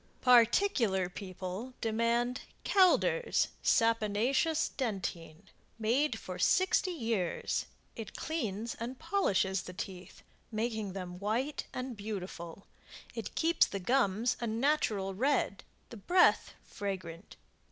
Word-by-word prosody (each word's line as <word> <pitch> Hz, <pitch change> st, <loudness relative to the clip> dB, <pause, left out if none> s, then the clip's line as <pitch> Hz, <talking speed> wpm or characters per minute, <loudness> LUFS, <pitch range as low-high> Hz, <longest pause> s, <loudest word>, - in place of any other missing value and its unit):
PARTICULAR 235 Hz, -, +4 dB
PEOPLE 190 Hz, +6 st, -6 dB
DEMAND 235 Hz, +2 st, 0 dB, 0.2 s
Calder's 410 Hz, +5 st, +3 dB
SAPONACEOUS 230 Hz, +7 st, +2 dB
Dentine 185 Hz, -, -4 dB, 0.3 s
Made 240 Hz, +7 st, +1 dB
for -, -, -7 dB
60 375 Hz, 0 st, +3 dB
years 225 Hz, -, -1 dB, 0.3 s
It 220 Hz, -3 st, -8 dB
cleans 230 Hz, -8 st, -3 dB
and 240 Hz, +3 st, -5 dB
polishes 200 Hz, -, +1 dB
the 180 Hz, -, -9 dB
teeth, 185 Hz, -1 st, -8 dB, 0.3 s
making 220 Hz, -3 st, -2 dB
them 180 Hz, -2 st, -6 dB
white 235 Hz, +9 st, -1 dB
and 255 Hz, -1 st, -5 dB
beautiful. 195 Hz, -4 st, -6 dB, 0.5 s
It -, -, -6 dB
keeps 330 Hz, +1 st, +3 dB
the 200 Hz, -, -4 dB
gums 230 Hz, +1 st, +1 dB
a 235 Hz, -, -2 dB
natural 220 Hz, -5 st, 0 dB
red, 250 Hz, -2 st, 0 dB, 0.3 s
the 235 Hz, -, -8 dB
breath 355 Hz, -, +3 dB
fragrant. 185 Hz, -3 st, -6 dB
225 Hz, 105 wpm, -32 LUFS, 195-260 Hz, 0.5 s, PARTICULAR